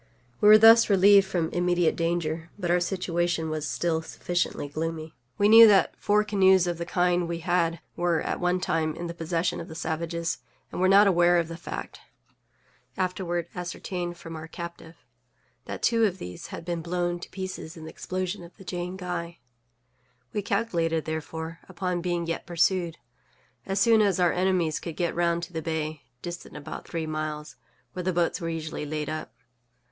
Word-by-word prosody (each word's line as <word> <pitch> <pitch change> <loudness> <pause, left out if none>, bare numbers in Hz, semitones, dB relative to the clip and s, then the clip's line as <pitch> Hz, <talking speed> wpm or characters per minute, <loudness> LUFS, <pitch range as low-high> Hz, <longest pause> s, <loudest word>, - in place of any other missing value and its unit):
We 210 - +4
were 215 0 +10
thus 225 +1 +7
relieved 200 0 +6
from 170 -4 -1
immediate 175 -1 +1
danger, 165 -1 -1
but 175 -4 -1
our 180 - +4
situation 175 -3 -1
was 155 -1 -3
still 165 -2 0
sufficiently 175 -2 -2
gloomy. 160 +1 -4 0.2
We 205 - +4
knew 225 +1 +10
that 200 -3 +4
four 210 +1 +2
canoes 190 -3 +4
of 175 -1 -2
the 170 - -4
kind 180 -1 +1
we 170 0 -3
had 170 -1 +1
were 175 -2 +1
at - - -3
one 180 0 +1
time 160 -3 0
in 175 - -5
the 170 - -4
possession 165 +1 -1
of 165 - -8
the 160 - -9
savages, 165 +1 -3 0.3
and - - -4
were 185 - +4
not 200 +2 +7
aware 175 -2 +4
of 165 -1 0
the 165 - -6
fact 170 - -7 1.0
(afterward 180 -2 -2
ascertained 175 0 -5
from 165 -1 -9
our 160 0 -7
captive) 170 0 -8 0.7
that - - -6
two 230 -1 +3
of 190 -3 -1
these 90 - -8
had - - -8
been 170 -1 -2
blown 175 +1 -2
to - - -9
pieces 185 -3 -6
in 160 - -9
the 160 - -8
explosion 185 +1 -4
of 170 - -14
the 195 - -14
_Jane 180 +1 -4
Guy._We 125 - -8
calculated, 170 -7 0
therefore, 160 +1 -5
upon 180 -1 -2
being 175 -1 -1
yet 165 0 -4
pursued, 175 -1 +1 0.7
as 195 0 0
soon 225 +1 +5
as 195 -4 +2
our 175 -2 +3
enemies 180 -4 +1
could 165 -3 -6
get 170 -2 0
round 170 0 +1
to 175 - -8
the 160 - -3
bay 155 -1 -3 0.2
(distant 175 -3 -7
about 150 +1 -8
three 165 -2 -3
miles) 155 -1 -4 0.4
where 180 - -4
the 185 +1 0
boats 175 0 0
were 165 - -2
usually 160 -2 -4
laid 150 0 -3
up. 155 -7 -5
175 Hz, 180 wpm, -27 LUFS, 160-180 Hz, 1.0 s, were